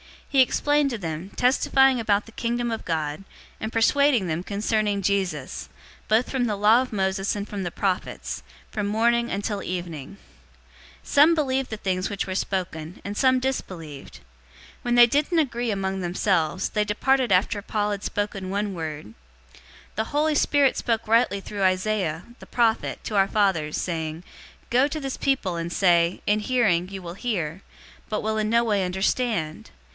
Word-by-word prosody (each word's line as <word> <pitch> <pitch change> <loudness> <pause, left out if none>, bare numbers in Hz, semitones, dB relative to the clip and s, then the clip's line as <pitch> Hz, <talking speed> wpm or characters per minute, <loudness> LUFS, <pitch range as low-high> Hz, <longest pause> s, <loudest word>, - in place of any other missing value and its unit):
He 275 -2 +4
explained 290 +2 +2
to 235 - -2
them, 165 -1 -5
testifying 265 +1 +3
about 210 -2 +1
the 225 - -14
Kingdom 235 +1 -2
of 225 - -4
God, 155 0 -2 0.4
and 220 - -4
persuading 250 0 +3
them 170 +1 -2
concerning 205 0 0
Jesus, 185 -8 -2 0.4
both 220 +3 +2
from 260 -2 +1
the 215 -3 0
law 215 +4 +5
of 255 - -5
Moses 195 0 0
and 205 0 -4
from 205 -2 -5
the 175 - -2
prophets, 185 +1 -3 0.3
from 210 -1 -2
morning 235 +3 +2
until 200 +1 -2
evening. 175 -2 -5 0.9
028:024 - - -20
Some 305 +4 +6
believed 270 -4 0
the 220 - -4
things 185 -2 -1
which 200 -2 -2
were 190 - -4
spoken, 180 -4 -3
and 200 +1 -5
some 260 -1 +4
disbelieved. 170 - -5
028:025 - - -14 0.6
When 240 0 +1
they 240 0 +9
didn't 295 +8 +1
agree 245 -6 0
among 195 -2 -1
themselves, 180 -1 0
they 210 -1 0
departed 255 +3 +1
after 200 +3 +2
Paul 210 0 -1
had 200 -1 -4
spoken 205 -2 -3
one 200 +1 -1
word, 155 - -6 0.8
"The 220 - -1
Holy 300 +5 +1
Spirit 285 -2 +3
spoke 225 -2 -1
rightly 225 -3 +3
through 200 0 -4
Isaiah, 185 -3 0 0.2
the - - -13
prophet, 230 -2 0
to 210 - -2
our 195 0 +4
fathers, 190 -8 +1
028:026 - - -1
saying, 160 -1 -4 0.5
'Go 255 +3 +4
to 310 +2 -4
this 270 -2 -4
people, 240 -11 0
and 170 0 -4
say, 170 -2 +3
in 210 +1 +2
hearing, 210 -7 +2
you 195 -1 -7
will 170 0 -6
hear, 190 -7 -3 0.5
but 215 - -1
will 220 0 -1
in 215 0 0
no 235 +1 +3
way 205 -4 +1
understand. 190 -2 -1
205 Hz, 170 wpm, -24 LUFS, 185-240 Hz, 0.9 s, they